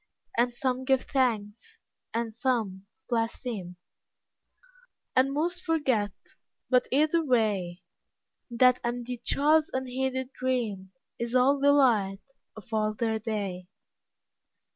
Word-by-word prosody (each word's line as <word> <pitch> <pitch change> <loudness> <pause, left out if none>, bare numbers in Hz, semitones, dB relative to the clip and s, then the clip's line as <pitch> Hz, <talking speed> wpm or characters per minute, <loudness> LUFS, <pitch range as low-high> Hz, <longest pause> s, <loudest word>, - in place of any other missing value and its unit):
And 240 +1 +3 0.4
give 265 -2 +4
some - - -19
thanks, 225 -5 -1 0.3
and 230 -1 -2
some 215 -6 -1 0.2
blaspheme, 225 -5 -3 1.4
And 260 +1 +4
most 345 +5 -1
forget, 270 - +1 0.6
but, 250 -1 +4
either 310 +5 +3
way, 210 - 0 0.7
That 250 +1 +4
and 240 0 -2
the 250 0 -4
child's 305 +2 +3
unheeded 260 0 -2
dream 225 -7 -2 0.3
Is 235 +1 -3
all 270 +3 +4
the 285 +1 +5
light 215 -9 +3 0.3
of 220 0 -12
all 215 -1 +1
their 220 -1 -1
day. 200 -5 -4
240 Hz, 110 wpm, -28 LUFS, 215-265 Hz, 1.4 s, the